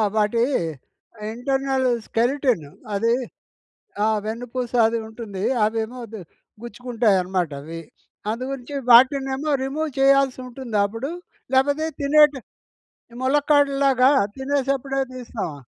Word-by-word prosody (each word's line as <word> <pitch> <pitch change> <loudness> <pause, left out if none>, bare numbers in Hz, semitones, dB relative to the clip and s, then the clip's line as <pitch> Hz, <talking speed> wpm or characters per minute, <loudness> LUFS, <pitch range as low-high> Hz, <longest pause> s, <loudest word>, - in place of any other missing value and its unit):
వాటి 220 +2 +2 0.9
internal 265 +1 0 0.2
skeleton 245 - +1 0.3
అది 230 +3 +2 0.9
ఆ! - - +3 0.2
వెన్నుపూస 240 +2 -4 0.2
అది 230 0 -1
ఉంటుంది 215 -4 -7 0.2
అవేమో 225 +3 -3
ఇది 215 -2 -9 0.4
గుచ్చుకుంటాయనమాట 205 -8 0
అవి. 165 +2 -7 0.5
అందు 235 +3 -4
గురించి 270 +1 -6 0.2
వాటినేమో 270 +4 +4
రిమూవ్ 300 +3 -2
చేయాల్సి 275 -1 +4
ఉంటుందా 235 -5 -2
అప్పుడు? 230 +9 -5 0.4
లేకపోతే 285 +4 +2
తినేటి 295 0 +5 0.8
ములక్కాడలాగా 275 -1 +3 0.3
తినేసేప్పుడే 270 0 -1
తీస్తామా? 230 - -5
255 Hz, 90 wpm, -22 LUFS, 225-275 Hz, 0.9 s, తినేటి